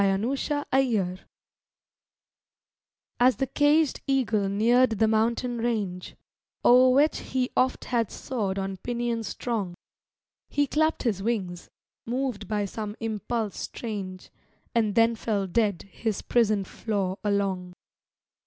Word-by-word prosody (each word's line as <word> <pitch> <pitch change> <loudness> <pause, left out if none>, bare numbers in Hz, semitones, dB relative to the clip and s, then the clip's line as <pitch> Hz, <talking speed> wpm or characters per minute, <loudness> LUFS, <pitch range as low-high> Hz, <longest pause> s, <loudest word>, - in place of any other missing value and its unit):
A 195 -1 +3
GLIMPSE 255 +9 -2
OF 290 -1 -1
HEAVEN 215 -9 +1 2.0
As 250 +1 +5
the 270 - 0
caged 290 +3 +2
eagle 225 -7 +1
neared 230 +3 +3
the 220 - +3
mountain 230 +2 +1
range, 210 -6 -2 0.5
O'er 255 +1 +7
which 285 +4 +3
he 255 -1 -2
oft 255 0 +1
had 230 -4 0
soared 205 -7 -3
on 195 0 -3
pinions 235 0 -2
strong, 200 -5 -3 0.7
He 290 0 +2
clapped 315 +3 +1
his 215 -6 0
wings, 190 -6 -2 0.4
moved 255 -1 -2
by 210 -1 0
some 210 +1 -5
impulse 220 0 -3
strange, 195 -5 -6 0.4
And 220 -4 +1
then 230 0 +5
fell 210 -3 -1
dead 200 -1 0
his 205 +1 -4
prison 215 -4 +2
floor 195 -1 -3
along. 195 -3 -1
225 Hz, 125 wpm, -26 LUFS, 200-250 Hz, 2.0 s, O'er